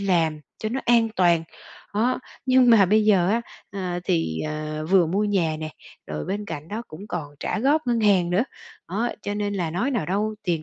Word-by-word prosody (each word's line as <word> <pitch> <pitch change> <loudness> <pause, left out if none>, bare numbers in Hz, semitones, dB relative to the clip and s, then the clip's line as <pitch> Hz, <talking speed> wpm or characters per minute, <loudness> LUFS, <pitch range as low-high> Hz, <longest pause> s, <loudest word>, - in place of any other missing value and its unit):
làm 165 -6 +1 0.2
cho 215 - -2
nó 255 +4 -2
an 235 -1 +4
toàn. 170 -3 +4 0.5
Đó, 235 +5 +1 0.3
nhưng 255 -1 +5
mà 210 -4 +7
bây 215 +3 +3
giờ 190 -5 +4
á, 230 +2 +1 0.3
à, 185 -3 -3
thì, 80 - 0
ờ, 155 0 -4
vừa 190 -3 +5
mua 195 +6 0
nhà 180 -7 +1
nè 155 0 -4 0.4
rồi 75 0 -4
bên 205 +2 -3
cạnh 150 -5 -7
đó 220 +4 -4
cũng 170 +7 -10
còn 150 -6 -5
trả - - -1
góp 285 +4 +2
ngân 240 -2 +1
hàng 190 -5 +3
nữa. 190 +7 +2 0.4
Đó, 215 +7 0
cho 205 - -3
nên 205 0 -2
là 175 -5 -1
nói 195 - -1
nào 235 - -1
đâu 210 +4 0
tiền 170 -6 -1
195 Hz, 210 wpm, -24 LUFS, 165-215 Hz, 0.5 s, mà